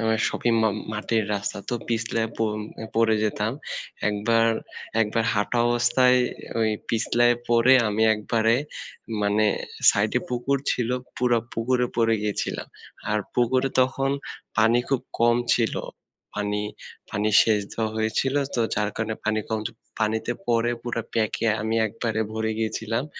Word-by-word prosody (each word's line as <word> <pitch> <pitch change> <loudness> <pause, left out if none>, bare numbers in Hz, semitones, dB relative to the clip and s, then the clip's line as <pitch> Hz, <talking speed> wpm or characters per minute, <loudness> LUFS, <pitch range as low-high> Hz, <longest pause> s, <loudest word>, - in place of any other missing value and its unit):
আ - - -2 0.3
সপিম 120 -1 0 0.4
মাটির 110 +1 0
রাস্তা। 100 0 -3
তো - - 0
পিছলে 115 0 0
প - - -15 0.6
পড়ে 115 -1 +3
যেতাম। 105 +1 0 0.6
একবার 115 +2 +2 0.5
একবার 110 +1 +1
হাঁটা 105 +4 0
অবস্থায় 120 +1 +4 0.4
ওই 110 - +3 0.2
পিছলায় 120 +1 +3
পড়ে 120 +2 +5
আমি 105 +1 0
একবারে 110 +2 +1 0.7
মানে 105 +1 +3 0.4
সাইডে - - +1
পুকুর 125 +3 0
ছিল, 120 -2 0 0.3
পুরা 120 -1 +3
পুকুরে 125 +2 +1
পড়ে 115 -1 +3
গিয়েছিলাম। 105 -1 -2 0.4
আর 105 - +2 0.2
পুকুরে 130 +2 +2
তখন 135 +1 +1 0.5
পানি 115 +2 +5
খুব 135 -3 +1 0.2
কম 120 0 +5 0.2
ছিল। 115 -2 +1 0.6
পানি, 105 0 -1 0.5
পানি 105 +1 0
শেষ 110 -2 +2
দ - - -8 0.2
হয়ে 110 0 0
ছিল 135 0 +1 0.2
তো 120 - +1
যার 105 0 0
কারণে 110 0 -2
পানি 110 0 +1
কম। 110 -1 0 0.4
পানিতে 110 +2 0
পড়ে 120 0 +2
পুরা 120 -1 -3
প্যাক 110 -2 +1
এ - - +4
আমি 110 +1 0
একবারে 110 +1 -2
ভরে 110 0 -1
গিয়েছিলাম। 115 +2 -1
115 Hz, 135 wpm, -25 LUFS, 110-120 Hz, 0.7 s, পড়ে